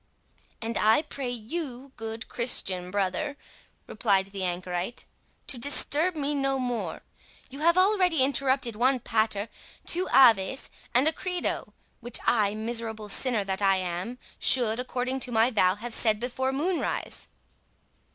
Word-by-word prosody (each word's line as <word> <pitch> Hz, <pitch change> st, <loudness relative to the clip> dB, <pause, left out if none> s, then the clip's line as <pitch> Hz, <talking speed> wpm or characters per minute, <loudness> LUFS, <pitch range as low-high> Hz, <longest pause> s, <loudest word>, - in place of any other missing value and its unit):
"And 225 Hz, 0 st, -2 dB
I 220 Hz, +8 st, +4 dB
pray 275 Hz, -4 st, -5 dB
you, 255 Hz, +2 st, -6 dB
good 225 Hz, 0 st, -6 dB
Christian 185 Hz, -7 st, +1 dB
brother," 200 Hz, +10 st, -1 dB, 0.5 s
replied 195 Hz, -5 st, +1 dB
the 195 Hz, -1 st, -4 dB
anchorite, 180 Hz, +4 st, -3 dB, 0.4 s
"to 250 Hz, -, -5 dB
disturb 295 Hz, +6 st, +3 dB
me 295 Hz, -1 st, -1 dB
no 275 Hz, -1 st, 0 dB
more. 245 Hz, -2 st, -3 dB, 0.5 s
You 275 Hz, -, -8 dB
have 340 Hz, +3 st, +3 dB
already 370 Hz, -6 st, +3 dB
interrupted 265 Hz, -3 st, +1 dB
one 255 Hz, +4 st, +2 dB
'pater', 220 Hz, -2 st, 0 dB, 0.4 s
two 360 Hz, +2 st, -1 dB
'aves', 235 Hz, -1 st, +4 dB, 0.2 s
and 255 Hz, +5 st, +3 dB
a 320 Hz, -, +2 dB
'credo', 360 Hz, +1 st, -4 dB, 0.2 s
which 240 Hz, 0 st, 0 dB
I, 210 Hz, -3 st, +2 dB
miserable 220 Hz, -1 st, -4 dB
sinner 235 Hz, 0 st, +1 dB
that 195 Hz, 0 st, -3 dB
I 195 Hz, -1 st, +4 dB
am, 185 Hz, +6 st, -4 dB, 0.2 s
should, 235 Hz, -3 st, +3 dB
according 255 Hz, +1 st, -3 dB
to 250 Hz, -1 st, -2 dB
my 230 Hz, +2 st, +3 dB
vow, 185 Hz, -5 st, +3 dB
have 230 Hz, +3 st, -7 dB
said 220 Hz, -2 st, +4 dB
before 260 Hz, +2 st, -2 dB
moonrise." 330 Hz, +6 st, -2 dB
240 Hz, 140 wpm, -27 LUFS, 215-270 Hz, 0.5 s, I